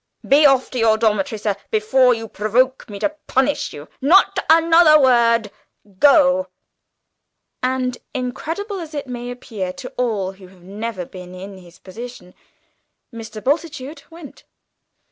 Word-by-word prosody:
Be 290 +2 +6
off 270 -2 +2
to 255 - -3
your 220 -1 +3
dormitory, 215 -1 0
sir, 210 -1 -2
before 245 +4 +3
you 225 0 -7
provoke 240 +6 0
me 205 - -7
to 300 +9 -2
punish 270 +2 0
you. 145 +1 -10
Not 380 +7 +4
another 325 -1 +6
word! 235 -5 +3 0.5
Go!" 280 -1 +4 1.1
And, 255 -1 -1
incredible 325 - -4
as 320 -3 -8
it 285 - -4
may 245 -1 -6
appear 220 -6 -5
to 255 - -10
all 215 -6 -1
who 190 -1 -15
have 180 -1 -20
never 200 0 -5
been 180 0 -11
in 190 +1 -10
his 175 -1 -17
position, 190 -1 -11 0.8
Mr. 220 -2 -9
Bultitude 290 0 -2
went. 330 -3 -13
245 Hz, 140 wpm, -20 LUFS, 210-280 Hz, 1.1 s, Be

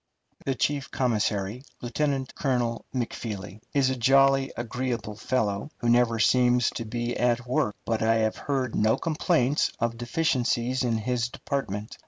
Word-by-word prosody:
The 135 - 0
chief 140 +2 -1
commissary, 110 -2 0 0.2
Lieutenant 135 +2 -1
Colonel 125 -4 -1
Macfeely, 110 -5 -4
is 135 -2 +2
a - - -1
jolly, 135 +2 +4
agreeable 120 -2 -3
fellow, 110 +1 -1
who 120 - -1
never 120 -1 +4
seems 125 +1 +3
to 115 - -5
be 120 +2 -3
at 120 0 +1
work, 125 -4 0
but 115 -1 0
I 115 +1 +3
have 110 -1 +1
heard 130 -4 -2
no 110 +1 +3
complaints 150 -4 +1
of 115 0 -1
deficiencies 125 -1 0
in 115 -2 +1
his 120 +2 -1
department. 125 -6 -4
120 Hz, 145 wpm, -27 LUFS, 115-130 Hz, 0.2 s, jolly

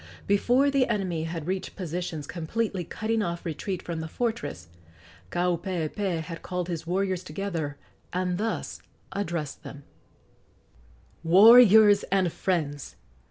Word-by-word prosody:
Before 245 +8 +3
the 275 -2 +2
enemy 185 -7 -1
had 165 -2 -5
reached 185 +2 -3
positions 175 -4 -4
completely 185 +5 -3
cutting 220 +6 -2
off 170 -3 -3
retreat 175 +3 -4
from 170 -2 -4
the 160 - -4
fortress, 235 - -3 0.6
Kaupeepee 175 - -1
had 165 +1 -8
called 180 -1 -4
his 165 -1 -4
warriors 185 0 -1
together 165 -4 -4 0.3
and 180 0 -1
thus 225 +1 -3 0.3
addressed 170 -7 -4
them: 140 0 -10 1.4
"Warriors 210 +3 +8
and 185 -3 +1
friends! 150 -6 -2
180 Hz, 115 wpm, -27 LUFS, 165-200 Hz, 1.4 s, Warriors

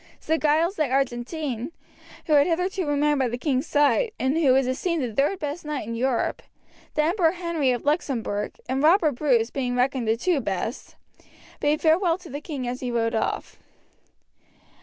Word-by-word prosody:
Sir 320 +1 0
Giles 320 +5 +2
de 305 -4 +1
Argentine, 260 +1 -2 0.5
who 310 - +1
had 290 +1 +5
hitherto 360 +1 -1
remained 290 0 +2
by 260 - +2
the 240 +1 -3
king's 260 0 -1
side, 295 - +2
and 265 +3 +1
who 315 -5 +4
was 265 0 +3
esteemed 305 +5 -1
the 235 -3 -3
third 285 - +1
best 300 +1 -5
knight 295 -7 -4
in 230 - -4
Europe 245 +1 -1 0.5
the 305 - +3
Emperor 335 0 +2
Henry 335 -6 -1
of 245 -2 0
Luxemberg 245 -9 -1
and 260 +2 -1
Robert 320 0 +5
Bruce 245 -4 +1
being 250 -3 -2
reckoned 250 -1 0
the 220 +1 +2
two 345 +4 +1
best 220 +4 -4 0.6
bade 295 +1 +1
farewell 335 +1 +3
to 360 -5 -13
the 285 +2 -5
king 285 -5 -5
as 250 +1 -3
he 250 - -3
rode 230 -1 0
off. 220 - -2
285 Hz, 180 wpm, -24 LUFS, 250-320 Hz, 0.6 s, had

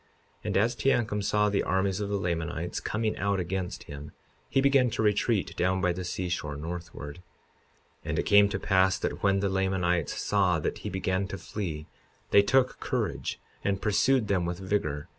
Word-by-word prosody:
And - - 0
as 115 +5 +3
Teancum 110 -3 +1
saw 105 +1 +2
the 100 -1 +1
armies 95 +1 0
of 100 -1 -2
the 100 - 0
Lamanites 85 -2 -2
coming 110 0 -1
out 100 0 0
against 90 0 -3
him 75 +1 -9 0.4
he - - +2
began 135 -2 +4
to 110 - -2
retreat 105 0 +1
down 95 +1 +1
by 90 -2 +1
the 90 +1 -5
seashore, 90 -5 -3
northward. 85 -1 -7 0.8
52:24 - - -7
And - - -1
it - - +1
came 100 0 +6
to 95 - -2
pass 95 -1 +3
that - - -3
when 100 -1 +2
the 100 - +1
Lamanites 95 -3 0
saw 95 -5 +2
that 75 - -3
he 105 - -5
began 95 0 -1
to 95 - -5
flee, 80 -9 -5 0.5
they 100 - +8
took 130 +5 +2
courage - - -2 0.2
and 100 -1 0
pursued 105 +4 +2
them 95 -4 +1
with 85 0 -2
vigor. 90 -6 -2
95 Hz, 180 wpm, -28 LUFS, 90-105 Hz, 0.8 s, they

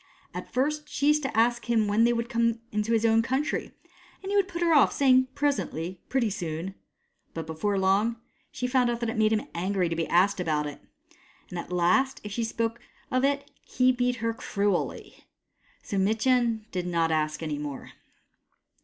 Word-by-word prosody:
At - - -7
first 300 +3 -1
she 285 - +1
used 300 0 +4
to 265 -6 -3
ask 240 +1 +2
him 225 -3 +3
when 210 +3 +3
they 240 - +4
would 235 0 -1
come 230 -1 +1
to 210 +1 -1
his 225 0 +2
own 225 0 +4
country, 265 +6 -1 0.5
and 385 - -4
he - - 0
would 400 -2 +3
put 345 -2 -3
her 335 -1 +4
off, 290 - +6
saying, 260 -2 +4
" - - -35
Presently 185 - -1
— - - -41
pretty 245 -5 +1
soon." 170 0 -4 0.6
But 165 -1 -4
before 160 +6 -1
long 195 +4 +2 0.4
she 250 - -4
found 250 -1 +2
that 235 -1 -1
it - - -6
made 220 -1 +3
him 215 -1 0
angry 185 0 0
to 165 - -2
be 165 -1 -1
asked 190 +3 +3
about 155 -4 0
it; 145 - -7 0.7
and 180 - -4
at 170 - -7
last, 180 +10 +2
if 210 - -7
she 230 +3 -2
spoke 225 +1 -2 0.3
of 255 0 +1
it, 280 +1 0
he 255 0 +2
beat 250 0 0
her 230 -1 -2
cruelly. 200 -4 -2 0.6
So 200 - -2
Mitjen 225 +2 +2
did 180 -1 -3
not 165 -2 +1
ask 155 0 -1
any 150 -2 -3
more. 145 -2 -6
225 Hz, 195 wpm, -27 LUFS, 180-255 Hz, 0.7 s, off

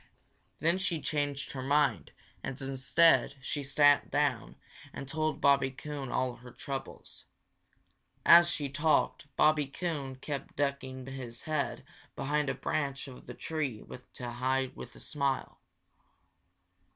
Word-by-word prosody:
Then 170 +5 +2
she 175 -4 0
changed 145 -2 -2
her 130 - -5
mind 140 -3 +2 0.3
and 130 - -5
instead 135 +3 +3
she 145 +2 -3
sat 145 +1 +4
down - - 0 0.4
and 140 - -6
told 155 +2 -1
Bobby 140 -1 +4
Coon 140 0 -6
all 125 -1 -1
her 125 - -12
troubles. 135 +1 -7 1.0
As 170 0 +9
she 145 -4 -1
talked, 150 +1 +1
Bobby 150 -2 +4
Coon 140 -3 -3
kept 140 +1 -6
ducking 130 -2 -2
his 130 -3 -7
head 155 -2 -2 0.3
behind 145 +1 0
a 135 - -1
branch 140 -2 -2
of 130 -2 -12
the - - -7
tree 145 -9 -3 0.3
to 120 -1 -6
hide 130 +2 0
a 120 - -10
smile. 140 -2 -2
140 Hz, 125 wpm, -31 LUFS, 130-150 Hz, 1.0 s, As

